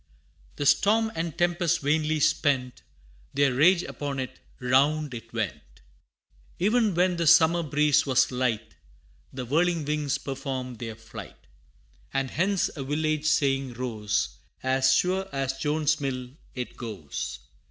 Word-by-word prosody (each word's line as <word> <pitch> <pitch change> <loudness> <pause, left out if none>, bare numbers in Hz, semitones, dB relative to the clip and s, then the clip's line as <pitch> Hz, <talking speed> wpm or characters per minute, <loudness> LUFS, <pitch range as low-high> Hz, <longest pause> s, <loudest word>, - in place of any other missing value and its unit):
The 145 - -3
storm 215 +10 +3
and 165 0 -4
tempest 175 -1 +1
vainly 155 +2 +1
spent 130 -4 +1 0.5
Their 140 -2 +3
rage 170 +7 +5
upon 145 -1 -5
it 130 - -5 0.2
round 140 +3 +2
it 115 -1 -9
went! 85 - -5 0.8
E'en 215 +1 +2
when 180 0 +2
the 170 -1 0
summer 165 +2 +6
breeze 150 -1 +3
was 130 -1 +3
light, 125 -3 -1 0.6
The 130 -1 -5
whirling 165 +4 +1
wings 150 -1 0
performed 130 -3 -5
their 115 -2 -5
flight; 115 - -11 0.7
And 135 -1 -1
hence 190 +3 +1
a 140 - -4
village 155 +2 -1
saying 135 -4 +1
rose 105 - -2 0.3
"As 130 0 +3
sure 185 +7 +1
as 135 -1 -2
Jones's 150 0 +1
mill, 130 -2 -3 0.2
it 125 -1 -5
goes." 100 - -5
140 Hz, 130 wpm, -26 LUFS, 125-160 Hz, 0.8 s, summer